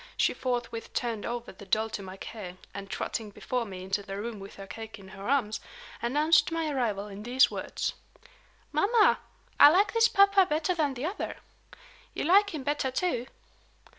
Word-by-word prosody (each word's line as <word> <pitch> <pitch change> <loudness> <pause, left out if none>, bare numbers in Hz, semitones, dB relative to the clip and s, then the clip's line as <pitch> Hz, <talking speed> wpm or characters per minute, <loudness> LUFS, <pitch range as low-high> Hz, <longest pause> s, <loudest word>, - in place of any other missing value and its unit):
She - - +3
forthwith 240 -2 -3
turned 230 -4 -2
over 240 0 -4
the 190 - -13
doll 220 +3 +2
to 205 - -4
my 190 0 -9
care, 190 -4 -8 0.2
and, 195 -1 -7
trotting 220 +1 -3
before 245 +4 -3
me 185 -3 -8
into 195 +2 -1
the 195 -1 -6
room 220 +1 -5
with 195 0 -10
her 195 - -9
cake 225 +2 -8
in 190 -2 -13
her 195 +3 -7
arms, 240 -6 +1 0.4
announced 300 +7 +3
my 325 -2 -1
arrival 220 -7 -1
in 205 0 -9
these 245 +4 +4
words: - - -3 0.8
"Mamma, 430 +1 +4 0.4
I - - +11
like 385 +5 +3
this 455 0 +5
papa 395 -2 +5
better 310 +4 +1
than 300 -6 0
the 255 +4 -4
other. 375 +6 -4 0.8
You - - -2
like 400 +5 +5
him 310 -7 -5
better, 290 -1 0
too." 255 -4 -1
240 Hz, 180 wpm, -29 LUFS, 205-310 Hz, 0.8 s, I